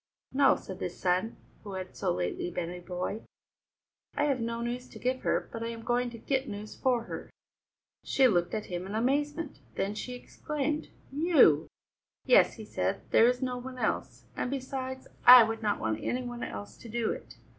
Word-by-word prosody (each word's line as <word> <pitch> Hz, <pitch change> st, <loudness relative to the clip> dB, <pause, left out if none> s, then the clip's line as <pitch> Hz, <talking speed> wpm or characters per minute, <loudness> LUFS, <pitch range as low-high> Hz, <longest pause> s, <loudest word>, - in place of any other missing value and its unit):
"No," 275 Hz, 0 st, +5 dB
said 190 Hz, -1 st, -8 dB
the -, -, -2 dB
son, 180 Hz, +5 st, 0 dB, 0.3 s
who 200 Hz, -2 st, -7 dB
had 185 Hz, -1 st, -6 dB
so -, -, 0 dB
lately 90 Hz, -, -2 dB
been 175 Hz, -1 st, -3 dB
a 180 Hz, -, -7 dB
boy, 180 Hz, +4 st, -4 dB, 0.9 s
"I -, -, +1 dB
have 280 Hz, -3 st, +2 dB
no 230 Hz, 0 st, -2 dB
news 245 Hz, +1 st, -4 dB
to -, -, -11 dB
give 255 Hz, +1 st, -1 dB
her, -, -, 0 dB
but 230 Hz, -, -5 dB
I 230 Hz, -, -2 dB
am 230 Hz, -1 st, -6 dB
going 245 Hz, +1 st, +1 dB
to 235 Hz, -, -9 dB
get 265 Hz, +3 st, -1 dB
news 210 Hz, +1 st, -7 dB
for 250 Hz, -3 st, +1 dB
her." -, -, -7 dB, 0.7 s
She 265 Hz, -1 st, +4 dB
looked 175 Hz, -3 st, +1 dB
at 215 Hz, -, -3 dB
him 180 Hz, +1 st, -5 dB
in 200 Hz, -, -5 dB
amazement; 290 Hz, -, 0 dB, 0.2 s
then 200 Hz, -, -1 dB
she 250 Hz, +4 st, -5 dB
exclaimed: 300 Hz, +4 st, -3 dB, 0.2 s
"You!" 280 Hz, -, +5 dB, 0.6 s
"Yes," -, -, +5 dB
he -, -, -9 dB
said, -, -, -1 dB
"there 230 Hz, -, +7 dB
is 250 Hz, +1 st, +1 dB
no 250 Hz, -1 st, -2 dB
one 255 Hz, +1 st, -8 dB
else. -, -, -2 dB
And -, -, -2 dB
besides 260 Hz, -1 st, -4 dB, 0.2 s
I 250 Hz, -1 st, +11 dB
would 225 Hz, 0 st, -2 dB
not 210 Hz, -2 st, 0 dB
want 110 Hz, 0 st, -1 dB
any 250 Hz, +1 st, -1 dB
one 240 Hz, -1 st, -5 dB
else 100 Hz, 0 st, -6 dB
to 230 Hz, -, -11 dB
do 230 Hz, 0 st, 0 dB
it. -, -, -8 dB
235 Hz, 195 wpm, -30 LUFS, 195-260 Hz, 0.9 s, I